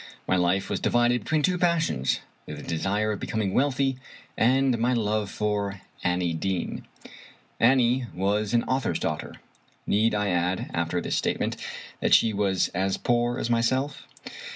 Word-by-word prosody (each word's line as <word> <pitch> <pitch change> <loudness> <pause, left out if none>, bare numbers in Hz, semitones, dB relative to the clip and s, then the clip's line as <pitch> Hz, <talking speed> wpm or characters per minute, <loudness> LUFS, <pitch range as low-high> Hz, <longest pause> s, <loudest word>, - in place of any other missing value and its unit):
My - - +2
life 90 +2 +1
was - - -2
divided 120 0 +2
between 155 -1 0
two 180 +1 +1
passions 165 - +1
— - - -37
^the 75 -1 -7
desire 100 +6 0
of 105 - -3
becoming 105 -4 -2
wealthy, 135 -1 +1 0.4
and 130 0 +3
my 120 +2 +2
love 105 -2 0
for 100 -2 -2 0.2
Annie 90 -1 +1
Deane. 90 +2 -3 0.7
Annie 125 0 +3
was 100 +3 0
an 115 - +3
author's 130 +1 0
daughter. - - -3 0.5
Need 110 +1 +2
I 105 -1 0
add, 90 +1 -1
after - - -1
this - - -2
statement, - - -1 0.4
that - - +5
she 110 - +3
was 100 -2 +1
as 95 +2 -1
poor 120 0 +1
as 120 - -2
myself? 130 +5 0
110 Hz, 155 wpm, -26 LUFS, 95-125 Hz, 0.7 s, that